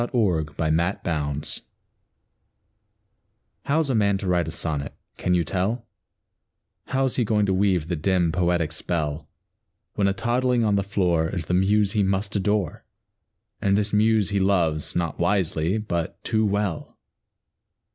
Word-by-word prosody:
THE 120 Hz, -, 0 dB
POET 85 Hz, -, 0 dB
AND 80 Hz, -1 st, +2 dB
THE 85 Hz, +3 st, -1 dB
BABY 75 Hz, -3 st, -2 dB, 2.2 s
How's 155 Hz, +1 st, +1 dB
a -, -, +1 dB
man 100 Hz, -3 st, +2 dB
to 95 Hz, -, -5 dB
write 90 Hz, -3 st, +1 dB
a -, -, -4 dB
sonnet, 75 Hz, -4 st, -3 dB, 0.2 s
can 90 Hz, -, +1 dB
you 85 Hz, -, +2 dB
tell, 105 Hz, +8 st, -2 dB, 1.0 s
How's 135 Hz, -1 st, 0 dB
he 125 Hz, -, +3 dB
going 105 Hz, -1 st, +2 dB
to 95 Hz, -, +1 dB
weave 95 Hz, -4 st, +1 dB
the 90 Hz, -, -1 dB
dim, 90 Hz, +1 st, +1 dB
poetic 85 Hz, -2 st, +1 dB
spell, 80 Hz, -2 st, -3 dB, 0.6 s
When 100 Hz, -, +1 dB
a 100 Hz, -, +2 dB
toddling 120 Hz, +3 st, +1 dB
on 105 Hz, -2 st, +2 dB
the 100 Hz, -, +2 dB
floor 90 Hz, -5 st, +1 dB
Is 85 Hz, -4 st, -3 dB
the 90 Hz, -, -2 dB
muse 100 Hz, +2 st, +3 dB
he 105 Hz, -, +1 dB
must 100 Hz, +2 st, -1 dB
adore, 100 Hz, -3 st, 0 dB, 0.8 s
And 100 Hz, 0 st, +2 dB
this 105 Hz, 0 st, -1 dB
muse 110 Hz, -1 st, +3 dB
he 100 Hz, -, +1 dB
loves, 85 Hz, -6 st, +1 dB
not 85 Hz, -3 st, -2 dB
wisely, 85 Hz, -1 st, +1 dB
but 85 Hz, -6 st, -3 dB
too 110 Hz, -1 st, +1 dB
well? 100 Hz, -4 st, -2 dB
95 Hz, 155 wpm, -24 LUFS, 85-105 Hz, 2.2 s, he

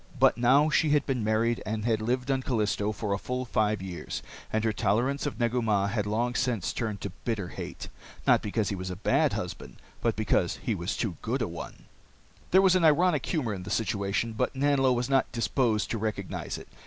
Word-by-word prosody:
But -, -, +5 dB
now 135 Hz, +6 st, +4 dB
she 155 Hz, -, +3 dB
had 145 Hz, -1 st, +3 dB
been 130 Hz, -5 st, -1 dB
married, 110 Hz, +2 st, +1 dB
and 110 Hz, 0 st, -3 dB
had 110 Hz, -2 st, +1 dB
lived 125 Hz, +4 st, 0 dB
on 135 Hz, -1 st, +1 dB
Callisto, 105 Hz, -4 st, 0 dB
for 105 Hz, -1 st, -2 dB
a 100 Hz, -, -1 dB
full 125 Hz, +3 st, -3 dB
five 105 Hz, -4 st, 0 dB
years, 90 Hz, -2 st, -5 dB, 0.3 s
and 110 Hz, 0 st, 0 dB
her 110 Hz, -1 st, +1 dB
tolerance 120 Hz, +7 st, +1 dB
of 145 Hz, -, -5 dB
Negu 120 Hz, +1 st, +1 dB
Mah 100 Hz, -3 st, +1 dB
had 105 Hz, 0 st, -1 dB
long 120 Hz, +4 st, 0 dB
since 120 Hz, -7 st, 0 dB
turned 110 Hz, -4 st, -3 dB
to 100 Hz, -, -4 dB
bitter 105 Hz, -7 st, -2 dB
hate. -, -, -7 dB, 0.4 s
Not -, -, +5 dB
because 105 Hz, 0 st, -1 dB
he 100 Hz, -, -2 dB
was 95 Hz, 0 st, -5 dB
a 90 Hz, -, -4 dB
bad 100 Hz, -, +2 dB
husband, -, -, -5 dB, 0.3 s
but -, -, +1 dB
because -, -, +1 dB
he -, -, 0 dB
was -, -, -3 dB
too -, -, -2 dB
good -, -, -1 dB
a -, -, -1 dB
one! -, -, -8 dB, 0.7 s
There 190 Hz, +2 st, +5 dB
was 185 Hz, -1 st, +5 dB
an 185 Hz, -, +3 dB
ironic 160 Hz, -1 st, +4 dB
humor 130 Hz, -, -1 dB
in 95 Hz, -, -5 dB
the 95 Hz, -, -8 dB
situation, 105 Hz, +1 st, -1 dB
but 110 Hz, -, -1 dB
Nanlo 135 Hz, -1 st, +3 dB
was 125 Hz, 0 st, 0 dB
not 135 Hz, -1 st, +2 dB
disposed 115 Hz, -2 st, 0 dB
to 115 Hz, -, -1 dB
recognize 100 Hz, -3 st, -3 dB
it. -, -, -11 dB
115 Hz, 215 wpm, -28 LUFS, 105-130 Hz, 0.7 s, But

